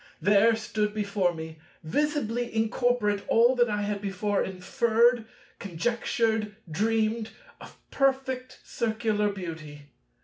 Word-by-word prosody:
There 210 Hz, +3 st, +4 dB
stood 215 Hz, -1 st, -2 dB
before 200 Hz, -3 st, 0 dB
me, 160 Hz, -1 st, -8 dB, 0.2 s
visibly 245 Hz, -, -1 dB
incorporate, 225 Hz, -2 st, +1 dB
all 240 Hz, +3 st, +4 dB
that 240 Hz, -1 st, +3 dB
I 210 Hz, -1 st, -1 dB
had 205 Hz, -1 st, -2 dB
before 200 Hz, +1 st, -1 dB
inferred, 225 Hz, +5 st, +2 dB, 0.3 s
conjectured, 220 Hz, +3 st, -1 dB
dreamed, 220 Hz, +5 st, 0 dB, 0.3 s
of -, -, -13 dB
perfect 260 Hz, -2 st, -1 dB
Circular 220 Hz, -2 st, -1 dB
beauty. 155 Hz, -6 st, -8 dB
215 Hz, 105 wpm, -27 LUFS, 200-235 Hz, 0.3 s, There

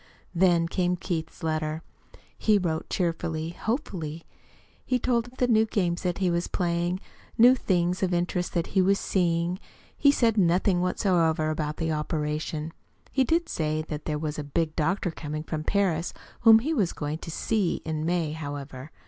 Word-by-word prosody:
Then 170 Hz, -2 st, +3 dB
came 180 Hz, +1 st, 0 dB
Keith's 170 Hz, -4 st, -4 dB
letter. 155 Hz, 0 st, -1 dB, 0.5 s
He 215 Hz, -1 st, +3 dB
wrote 165 Hz, -4 st, -2 dB
cheerfully, 165 Hz, -2 st, -1 dB
hopefully. 170 Hz, -, -3 dB, 0.6 s
He 255 Hz, -, +1 dB
told 245 Hz, -1 st, 0 dB
of 250 Hz, -, +3 dB
new 220 Hz, 0 st, +4 dB
games 175 Hz, -5 st, 0 dB
that 180 Hz, -2 st, -1 dB
he 185 Hz, -3 st, +1 dB
was 170 Hz, 0 st, 0 dB
playing, 175 Hz, +1 st, -1 dB, 0.4 s
new 245 Hz, +3 st, +8 dB
things 180 Hz, -7 st, 0 dB
of 185 Hz, -2 st, +1 dB
interest 175 Hz, +1 st, -1 dB
that 170 Hz, -, 0 dB
he 190 Hz, -, +4 dB
was 195 Hz, +2 st, +3 dB
"seeing." 175 Hz, -1 st, 0 dB, 0.4 s
He 285 Hz, -, +4 dB
said 230 Hz, -6 st, +2 dB
nothing 180 Hz, +1 st, +3 dB
whatever 165 Hz, -4 st, +1 dB
about 150 Hz, -1 st, -3 dB
the 165 Hz, -1 st, -1 dB
operation. 150 Hz, 0 st, -2 dB, 0.4 s
He 265 Hz, -, +3 dB
did 330 Hz, +6 st, +1 dB
say 155 Hz, -1 st, -1 dB
that 150 Hz, -1 st, -5 dB
there 150 Hz, -1 st, -1 dB
was 150 Hz, 0 st, -3 dB
a -, -, -3 dB
big 155 Hz, +2 st, -1 dB
doctor 175 Hz, +3 st, 0 dB
coming 155 Hz, -1 st, -5 dB
from 155 Hz, -1 st, -4 dB
Paris, 180 Hz, -3 st, 0 dB, 0.2 s
whom 225 Hz, -1 st, +8 dB
he 285 Hz, +9 st, -1 dB
was 200 Hz, -, +1 dB
going 150 Hz, +1 st, -4 dB
to -, -, -8 dB
"see" 195 Hz, +2 st, 0 dB
in 155 Hz, -1 st, -2 dB
May, 170 Hz, -2 st, 0 dB
however. 145 Hz, -3 st, -6 dB
170 Hz, 165 wpm, -27 LUFS, 155-190 Hz, 0.6 s, new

